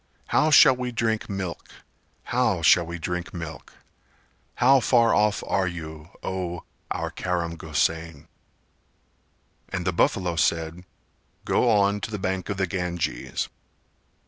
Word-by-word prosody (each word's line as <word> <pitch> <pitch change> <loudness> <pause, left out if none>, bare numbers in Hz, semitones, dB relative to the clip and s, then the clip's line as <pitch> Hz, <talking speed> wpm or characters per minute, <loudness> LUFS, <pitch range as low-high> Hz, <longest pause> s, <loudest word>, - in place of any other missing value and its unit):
How 155 - +3
shall 150 -3 +8
we 125 0 -4
drink 110 -2 -1
milk? 95 -3 -5 0.5
How - - 0
shall 85 -1 +5
we 85 +1 -5
drink 90 +2 -4
milk? 80 -2 -8 0.8
How 135 +2 +5
far 120 -2 +3
off 105 -1 +2
are 95 -1 +1
you, 80 -2 -7
O 90 -2 -4 0.3
our - - -3
Karam 85 -2 -2
Gosain?" 80 -1 -2 1.4
And 95 -2 -3
the 90 - 0
buffalo 90 0 +1
said 85 +2 0 0.6
"Go 125 - +2
on 100 -1 +3
to - - -4
the 105 - -4
bank 95 0 -3
of 100 - -2
the 95 - +1
Ganges." 90 -2 -3
90 Hz, 130 wpm, -25 LUFS, 85-105 Hz, 1.4 s, shall